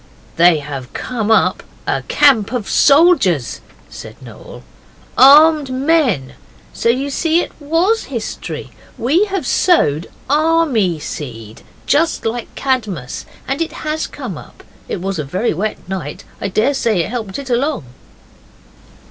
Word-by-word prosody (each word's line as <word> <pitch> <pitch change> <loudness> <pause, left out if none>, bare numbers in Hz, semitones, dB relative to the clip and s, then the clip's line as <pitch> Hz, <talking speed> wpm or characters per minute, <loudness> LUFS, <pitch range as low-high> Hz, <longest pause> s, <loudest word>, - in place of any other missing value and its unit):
'They 170 -1 +5
have 140 -4 -7
come 225 -4 -3
up 220 - +3 0.2
a - - -1
camp 225 -7 +4
of 245 -5 -3
soldiers,' 275 - +3 0.3
said - - -11
Noel - - -12 0.5
ARMED 295 +2 +7
MEN. 260 - +1 0.4
So 230 - 0
you 270 +4 0
see 325 +4 +1
it - - -6
WAS 335 +9 +1
history. - - -6 0.3
We 310 - +2
have 390 -7 -3
sowed 205 - +2 0.2
army 295 - +2
seed, 115 -7 -8 0.2
just 320 -1 +1
like 230 +1 -4
Cadmus, 215 - -3 0.2
and 270 +4 -2
it 330 - -2
has 310 +1 -2
come - - -7
up. - - -15 0.3
It 175 - -3
was 190 -2 -3
a - - -1
very 185 - -1
wet 205 +6 -2
night. 180 -7 -5 0.2
I - - -1
daresay 215 -2 +1
that - - -5
helped 220 -5 -4
it 275 -2 -6
along. 270 - 0
245 Hz, 135 wpm, -17 LUFS, 180-300 Hz, 0.5 s, ARMED